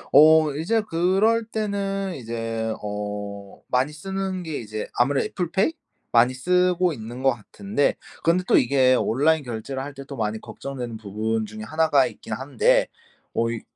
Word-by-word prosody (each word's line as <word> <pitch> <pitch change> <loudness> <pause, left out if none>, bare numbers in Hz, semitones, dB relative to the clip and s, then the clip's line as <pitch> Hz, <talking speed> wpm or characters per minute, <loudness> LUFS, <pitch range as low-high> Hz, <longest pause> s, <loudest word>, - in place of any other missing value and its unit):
어 155 0 +7
이제 175 +10 +1
그럴 195 +6 +2
때는 200 -3 -2
이제 115 -2 -3
어 105 -1 -5
많이 130 +3 +1
쓰는 190 +3 -4
게 160 -3 -4
이제 110 -1 -5
아무래도 135 +3 +2
애플 175 -3 -3
페이 200 +12 +2 0.4
많이 120 +2 +4
쓰고 180 +3 +2
있는 120 +1 -8
것 135 - +5
같은데 145 - -1 0.3
근데 175 +2 +3
또 - - +3
이게 130 0 +4
온라인 145 +6 +2
결제를 125 +2 -5
할 140 +1 -7
때 140 - -8
또 140 - -7
많이 110 -2 -2
걱정되는 125 -2 -6
부분 110 +1 -2
중에 110 +1 -8
1 160 +6 +1
가 - - +5
있긴 - - -7
한데 - - +2 0.5
어 115 - +1
이 115 -1 -4
140 Hz, 290 characters per minute, -24 LUFS, 115-180 Hz, 0.5 s, 어